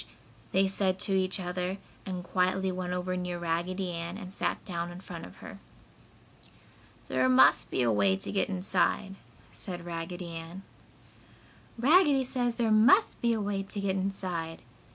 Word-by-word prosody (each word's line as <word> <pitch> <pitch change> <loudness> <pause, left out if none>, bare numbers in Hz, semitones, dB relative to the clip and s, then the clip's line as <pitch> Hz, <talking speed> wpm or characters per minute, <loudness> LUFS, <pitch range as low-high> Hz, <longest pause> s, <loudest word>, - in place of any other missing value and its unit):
"Sh! - - -10
Sh!" - - -22 0.4
they 190 +1 +4
said 190 -1 0
to 195 - 0
each 190 +1 +1
other 180 +1 -3 0.3
and 180 -2 -4
quietly 185 +1 +1
went 180 -1 -4
over 180 0 -2
near 180 -1 -3
Raggedy 175 +2 -2
Ann 170 +2 -4
and 190 -3 -8
sat - - -2
down 170 -2 -3
in 175 - -9
front 175 -3 -8
of 90 - -15
her. - - -9 1.5
"There 130 0 +2
must 130 +1 +5
be 130 - 0
a 120 - +3
way 100 -2 +3
to 95 - -5
get 200 - 0
inside," 195 +1 +1 0.4
said 175 -3 -6
Raggedy 175 +1 -5
Ann. 165 +3 -8 1.1
"Raggedy 285 +1 +5
says 245 -2 -1
there 230 -2 +1
must 240 - +5
be 235 - +3
a 225 - -1
way 200 -1 -1
to 195 +1 -3
get 195 -1 0
inside!" 185 -5 -3
185 Hz, 170 wpm, -29 LUFS, 170-195 Hz, 1.5 s, must